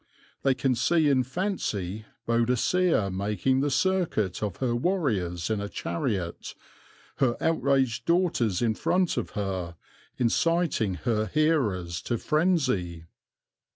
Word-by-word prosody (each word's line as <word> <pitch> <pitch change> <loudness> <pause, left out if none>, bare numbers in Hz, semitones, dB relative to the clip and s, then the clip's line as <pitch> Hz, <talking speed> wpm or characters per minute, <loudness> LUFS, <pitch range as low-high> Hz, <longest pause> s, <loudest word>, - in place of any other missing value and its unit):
They 135 -1 +2
can 130 0 +1
see 150 +5 +2
in 135 -2 +4
fancy 115 - -3 0.2
Boadicea 120 - +2
making 105 +7 0
the 145 +2 +1
circuit 145 - 0
of 105 -4 -2
her 125 -3 0
warriors 110 - -1
in 105 -2 0
a 100 - -4
chariot, 85 -1 -3 0.6
her 125 -4 +1
outraged 135 -7 +1
daughters 160 - +1
in 115 -2 +2
front 180 - +1
of - - -2
her, 95 -4 -3 0.4
inciting 130 - +1
her 110 -2 +1
hearers 105 - 0
to 120 - -2
frenzy. 130 - 0
120 Hz, 120 wpm, -27 LUFS, 100-155 Hz, 0.6 s, in